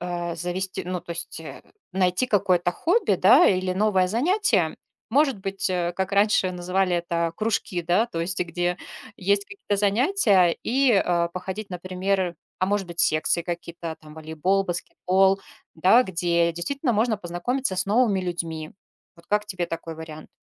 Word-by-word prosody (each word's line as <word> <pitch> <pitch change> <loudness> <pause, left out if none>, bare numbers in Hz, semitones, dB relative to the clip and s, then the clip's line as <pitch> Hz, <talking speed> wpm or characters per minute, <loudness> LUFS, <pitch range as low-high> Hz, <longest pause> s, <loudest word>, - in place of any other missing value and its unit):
э, 175 -1 -4
завести 180 +3 -3
ну 180 0 -3
то 170 - -13
есть, 170 -1 -5
э, 160 - -10 0.3
найти 185 +5 +1
какое-то 180 -5 +2
хобби, 355 - +1
да, - - +6
или 185 -1 +1
новое 190 -1 +2
занятие, 235 - +1 0.3
может 275 -2 +2
быть, 195 0 -3
э, 175 -1 -1
как 190 +1 -2
раньше 200 -2 +3
называли 180 0 0
это 170 -1 -1
кружки, 215 -5 -1
да? 180 +7 +2
То 170 -8 -5
есть 180 +3 -1
где 175 0 -1 0.4
есть 200 0 +1
какие-то 395 - -4
занятия 205 - +3
и, 270 +2 +2
э, 175 -4 +2
походить, 190 +3 -6
например, 185 0 -2 0.2
а, 185 - +1
может 200 -1 0
быть, 170 -1 -10
секции 155 +2 +2
какие-то, 170 -1 -6
там, 155 -1 -14
волейбол, 160 +5 -1
баскетбол, 190 +2 +1 0.3
да? 190 +9 +5
Где 170 -4 0
действительно 255 - -2
можно 220 +1 +1
познакомиться 195 +5 -2
с 190 +3 0
новыми 210 -2 +2
людьми. 165 -3 -4 0.4
Вот 170 0 -20
как 210 0 0
тебе 180 -3 -3
такой 165 -1 -6
вариант? 155 -1 -10
185 Hz, 155 wpm, -24 LUFS, 170-205 Hz, 0.4 s, да